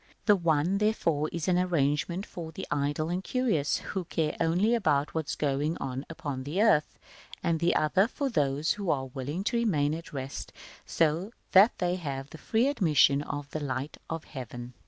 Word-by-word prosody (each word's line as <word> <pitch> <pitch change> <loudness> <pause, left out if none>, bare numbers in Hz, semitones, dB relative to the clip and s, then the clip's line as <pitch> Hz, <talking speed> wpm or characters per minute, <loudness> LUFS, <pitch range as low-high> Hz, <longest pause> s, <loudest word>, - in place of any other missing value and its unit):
The 210 -1 +6
one, 170 +1 +1
therefore, 165 -8 +1
is 170 -2 -3
an 180 -1 +3
arrangement 170 +1 0
for 165 -2 -7
the - - -6
idle 145 +2 0
and 180 +2 -2
curious, 220 - +1 0.2
who 190 -2 -2
care 160 -1 -1
only 180 +8 +3
about 150 -11 +1
what 160 -2 -2
is - - -1
going 145 +2 0
on 130 +2 -5
upon 145 -5 -5
the 150 +8 -3
earth: 210 -9 +3 0.5
the 170 0 +2
other 185 +7 +3
for 280 +3 -2
those 145 - +1
who 200 -4 -2
are 135 -3 +1
willing 145 +7 -3
to 235 +3 0
remain 155 -11 +1
at 165 +1 -7
rest, 135 -2 -6 0.3
so 165 +7 +1 0.2
that 200 +4 +6
they 180 0 0
have 140 -5 -5
free 225 - 0
admission 155 - +4
of 145 -1 -5
the 155 - -3
light 140 0 -4
of 165 -1 -4
Heaven. 125 -2 -8
160 Hz, 175 wpm, -29 LUFS, 145-185 Hz, 0.5 s, The